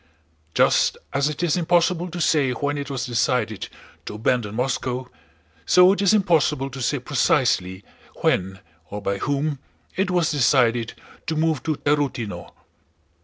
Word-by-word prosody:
Just -, -, +3 dB, 0.2 s
as 140 Hz, +2 st, +1 dB
it 150 Hz, +3 st, -5 dB
is 165 Hz, -4 st, +2 dB
impossible 175 Hz, 0 st, +1 dB
to 175 Hz, +1 st, -6 dB
say 145 Hz, -5 st, +2 dB
when 145 Hz, +3 st, -2 dB
it 140 Hz, 0 st, -5 dB
was 135 Hz, -3 st, -3 dB
decided 115 Hz, -3 st, -1 dB, 0.4 s
to -, -, -5 dB
abandon 110 Hz, -1 st, -1 dB
Moscow, 125 Hz, 0 st, -2 dB, 0.6 s
so 180 Hz, +1 st, +6 dB
it 200 Hz, -, -3 dB
is 200 Hz, -, +4 dB
impossible 155 Hz, -9 st, +2 dB
to 130 Hz, +1 st, -7 dB
say 145 Hz, +4 st, 0 dB
precisely 120 Hz, -8 st, 0 dB, 0.4 s
when, 95 Hz, 0 st, 0 dB, 0.3 s
or 105 Hz, -, -5 dB
by 100 Hz, -1 st, -2 dB
whom, 145 Hz, +2 st, -1 dB, 0.4 s
it 190 Hz, +1 st, 0 dB
was 175 Hz, -3 st, +1 dB
decided 120 Hz, -5 st, +2 dB, 0.3 s
to 160 Hz, -, -1 dB
move 155 Hz, -3 st, 0 dB
to 155 Hz, -2 st, -1 dB
Tarútino. 130 Hz, -, -2 dB
140 Hz, 145 wpm, -22 LUFS, 120-160 Hz, 0.6 s, so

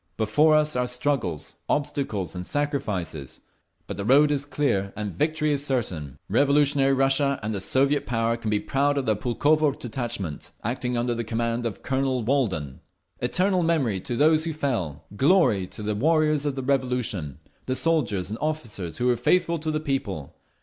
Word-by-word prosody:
Before 145 Hz, +9 st, +4 dB
us 150 Hz, -1 st, +2 dB
are 125 Hz, 0 st, +1 dB
struggles, 125 Hz, -, -2 dB, 0.2 s
obstacles 135 Hz, -9 st, -1 dB
and 90 Hz, -1 st, -5 dB
sacrifices. 105 Hz, -, -3 dB, 0.4 s
But -, -, -6 dB
the 100 Hz, -, -3 dB
road 140 Hz, +7 st, +5 dB
is 145 Hz, -1 st, 0 dB
clear 100 Hz, -10 st, 0 dB
and 105 Hz, -2 st, -4 dB
victory 155 Hz, -, 0 dB
is 140 Hz, -1 st, -1 dB
certain. 90 Hz, -, -2 dB
Revolutionary 140 Hz, +3 st, +3 dB
Russia 135 Hz, +1 st, +2 dB
and 110 Hz, +1 st, -2 dB
the 100 Hz, -, -3 dB
Soviet 140 Hz, +7 st, +1 dB
Power 115 Hz, -1 st, +1 dB
can 115 Hz, -2 st, -4 dB
be 105 Hz, -1 st, +2 dB
proud 140 Hz, +4 st, +1 dB
of 135 Hz, -, 0 dB
their 110 Hz, -, +3 dB
Pulkovo 145 Hz, +8 st, +2 dB
detachment, 115 Hz, -, -5 dB
acting 125 Hz, +1 st, -2 dB
under 120 Hz, 0 st, 0 dB
the 120 Hz, 0 st, -2 dB
command 115 Hz, +1 st, -1 dB
of 105 Hz, -, -7 dB
Colonel 130 Hz, -2 st, 0 dB
Walden. 105 Hz, -, -1 dB, 0.4 s
Eternal 180 Hz, +9 st, +1 dB
memory 145 Hz, -, +1 dB
to 120 Hz, -, -4 dB
those 155 Hz, +4 st, +4 dB
who 165 Hz, -, -2 dB
fell! 105 Hz, -, -2 dB
Glory 135 Hz, -, +3 dB
to 105 Hz, -, -9 dB
the 105 Hz, 0 st, -1 dB
warriors 150 Hz, +4 st, +2 dB
of 140 Hz, -, -1 dB
the 135 Hz, -, -4 dB
Revolution, 125 Hz, -, -1 dB, 0.3 s
the 130 Hz, -, 0 dB
soldiers 110 Hz, -, 0 dB
and 110 Hz, -, -3 dB
the -, -, -17 dB
officers 115 Hz, -, -3 dB
who 125 Hz, -, -1 dB
were 125 Hz, -1 st, +4 dB
faithful 170 Hz, +7 st, +2 dB
to 155 Hz, +1 st, -3 dB
the 155 Hz, 0 st, 0 dB
People! 125 Hz, -, -3 dB
125 Hz, 175 wpm, -25 LUFS, 105-145 Hz, 0.4 s, road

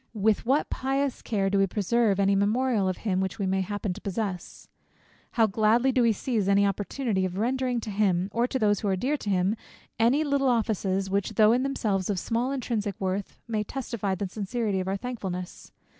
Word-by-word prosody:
With 215 Hz, +2 st, +1 dB
what 275 Hz, +4 st, +2 dB
pious 270 Hz, 0 st, -1 dB
care 200 Hz, -4 st, 0 dB
do 200 Hz, -, +2 dB
we 195 Hz, -, +4 dB
preserve 210 Hz, +1 st, +1 dB
any 195 Hz, 0 st, +3 dB
memorial 210 Hz, 0 st, +2 dB
of 185 Hz, -, -3 dB
him, 190 Hz, -3 st, +1 dB
which 190 Hz, +2 st, -3 dB
we 200 Hz, -, -1 dB
may 190 Hz, 0 st, +1 dB
happen 205 Hz, 0 st, -3 dB
to 205 Hz, -, -11 dB
possess? 195 Hz, -3 st, -4 dB, 0.7 s
How 230 Hz, -3 st, +4 dB
gladly 220 Hz, +5 st, +3 dB
do 255 Hz, -, +2 dB
we 235 Hz, -1 st, +4 dB
seize 220 Hz, -1 st, -1 dB
any 200 Hz, 0 st, +4 dB
opportunity 200 Hz, +1 st, -1 dB
of 185 Hz, 0 st, -2 dB
rendering 250 Hz, +2 st, 0 dB
to 215 Hz, -, -5 dB
him, 195 Hz, -3 st, +1 dB
or 235 Hz, +3 st, +1 dB
to 260 Hz, -, -2 dB
those 205 Hz, -4 st, +2 dB
who 210 Hz, -, -3 dB
are 190 Hz, -, +2 dB
dear 260 Hz, +10 st, 0 dB
to 210 Hz, -, -5 dB
him, 190 Hz, +2 st, +2 dB, 0.4 s
any 245 Hz, +7 st, +4 dB
little 280 Hz, -2 st, +1 dB
good 250 Hz, -, +4 dB
offices, 195 Hz, -4 st, -1 dB
which, 200 Hz, +2 st, -1 dB
though 215 Hz, +1 st, +6 dB
in 245 Hz, +2 st, +3 dB
themselves 215 Hz, -9 st, -1 dB
of 200 Hz, -, 0 dB
small 235 Hz, +7 st, -1 dB
intrinsic 225 Hz, -7 st, -2 dB
worth, 190 Hz, +1 st, -3 dB
may 215 Hz, -2 st, -1 dB
testify 210 Hz, -5 st, -3 dB
the 195 Hz, +1 st, -3 dB
sincerity 205 Hz, +1 st, -2 dB
of 185 Hz, -, -3 dB
our 195 Hz, +1 st, -1 dB
thankfulness! 190 Hz, -7 st, -6 dB
210 Hz, 205 wpm, -27 LUFS, 195-240 Hz, 0.7 s, though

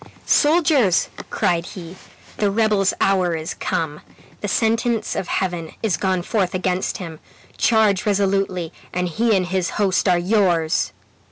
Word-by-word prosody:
"Soldiers!" 295 Hz, -, +3 dB, 0.2 s
cried 170 Hz, -1 st, 0 dB
he, 175 Hz, -1 st, -9 dB, 0.4 s
"the 205 Hz, -, +1 dB
rebel's 210 Hz, -2 st, +2 dB
hour 185 Hz, -3 st, +2 dB
is 160 Hz, 0 st, -4 dB
come. 150 Hz, -2 st, -3 dB, 0.4 s
The 205 Hz, -, -4 dB
sentence 225 Hz, +1 st, 0 dB
of 175 Hz, -, -3 dB
Heaven 175 Hz, -4 st, -2 dB
is 210 Hz, -6 st, +2 dB
gone 185 Hz, +1 st, -1 dB
forth 190 Hz, -3 st, -1 dB
against 185 Hz, 0 st, -1 dB
him. 165 Hz, -4 st, -8 dB, 0.4 s
Charge 220 Hz, -2 st, +2 dB
resolutely, 195 Hz, -4 st, 0 dB, 0.2 s
and 180 Hz, 0 st, -1 dB
he 220 Hz, +6 st, +1 dB
and 185 Hz, -, 0 dB
his 185 Hz, -1 st, -1 dB
host 195 Hz, -2 st, +2 dB
are 180 Hz, -, +4 dB
yours!" 175 Hz, -4 st, +1 dB
190 Hz, 140 wpm, -21 LUFS, 175-210 Hz, 0.4 s, are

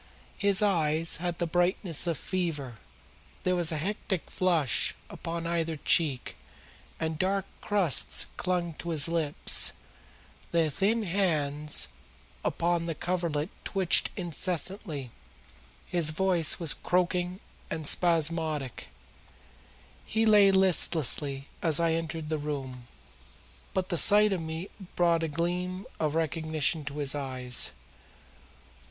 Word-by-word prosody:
His 200 Hz, 0 st, +3 dB
eyes 165 Hz, -4 st, +1 dB
had 175 Hz, 0 st, -3 dB
the 170 Hz, -, -1 dB
brightness 175 Hz, 0 st, +2 dB
of 165 Hz, -3 st, -1 dB
fever, 150 Hz, -11 st, -4 dB, 0.7 s
there 185 Hz, 0 st, +1 dB
was 175 Hz, -2 st, +1 dB
a 155 Hz, -, -1 dB
hectic 190 Hz, +1 st, -4 dB
flush 170 Hz, -8 st, 0 dB, 0.2 s
upon 165 Hz, 0 st, -6 dB
either 165 Hz, -1 st, -2 dB
cheek, 145 Hz, -4 st, +1 dB, 0.6 s
and 160 Hz, -1 st, -3 dB
dark 195 Hz, +1 st, 0 dB, 0.2 s
crusts 160 Hz, -, +1 dB
clung 175 Hz, -2 st, -2 dB
to 170 Hz, -, -6 dB
his 155 Hz, -3 st, +4 dB
lips; 165 Hz, -3 st, +2 dB, 0.8 s
the 165 Hz, -2 st, +1 dB
thin 215 Hz, +8 st, 0 dB
hands 150 Hz, -, 0 dB, 0.6 s
upon 170 Hz, 0 st, -1 dB
the 165 Hz, -, -3 dB
coverlet 170 Hz, -2 st, -2 dB
twitched 190 Hz, -3 st, +2 dB
incessantly, 175 Hz, -, -1 dB, 0.7 s
his 170 Hz, -3 st, +3 dB
voice 175 Hz, 0 st, +1 dB
was 165 Hz, -6 st, +3 dB
croaking 180 Hz, +4 st, -1 dB, 0.3 s
and 160 Hz, -, -4 dB
spasmodic. 160 Hz, -5 st, +1 dB, 1.2 s
He 220 Hz, +1 st, -1 dB
lay 210 Hz, -2 st, +6 dB
listlessly 155 Hz, -7 st, +3 dB, 0.2 s
as 160 Hz, -3 st, +4 dB
I 165 Hz, -1 st, +1 dB
entered 165 Hz, -1 st, -4 dB
the 155 Hz, -1 st, -2 dB
room, 135 Hz, -4 st, -6 dB, 0.9 s
but 185 Hz, 0 st, -1 dB
the 175 Hz, -4 st, +1 dB
sight 210 Hz, 0 st, +5 dB
of 180 Hz, -, -3 dB
me 160 Hz, +3 st, -6 dB, 0.2 s
brought 170 Hz, -1 st, +2 dB
a 165 Hz, -, -1 dB
gleam 180 Hz, +4 st, -3 dB
of 155 Hz, -1 st, -1 dB
recognition 160 Hz, -1 st, 0 dB
to 140 Hz, +1 st, -6 dB
his 140 Hz, -2 st, +2 dB
eyes. 130 Hz, -3 st, +1 dB
165 Hz, 120 wpm, -28 LUFS, 150-180 Hz, 1.2 s, lay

